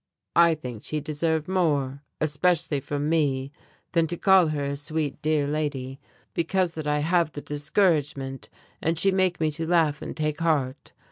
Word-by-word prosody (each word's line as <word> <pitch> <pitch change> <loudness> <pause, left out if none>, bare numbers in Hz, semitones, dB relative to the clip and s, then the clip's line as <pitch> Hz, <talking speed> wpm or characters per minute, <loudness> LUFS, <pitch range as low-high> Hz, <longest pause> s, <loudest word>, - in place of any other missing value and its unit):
I 170 -1 +6
think 125 -7 -8
she 155 - -2
deserve 155 +1 -1
more 145 -7 0 0.2
especially 155 0 +1
from 145 +2 -3
me 140 -4 +1 0.4
than 165 -1 +2
to 175 +2 -3
call 190 -2 +5
her 150 -2 -2
a 140 0 -2
Sweet 150 -1 -3
Dear 155 -1 +1
Lady, 140 -3 -3 0.3
because 175 +1 0
that 155 -2 -5
I 150 0 +2
have 170 0 +2
the 145 - -6
discouragement, 145 -3 0 0.3
and 165 +1 0
she 195 +5 +3
make 185 -2 +1
me 155 -1 +1
to 160 +2 -4
laugh 160 -4 +2
and - - -6
take 150 -1 -1
heart. 150 -5 -1
155 Hz, 165 wpm, -26 LUFS, 145-165 Hz, 0.4 s, I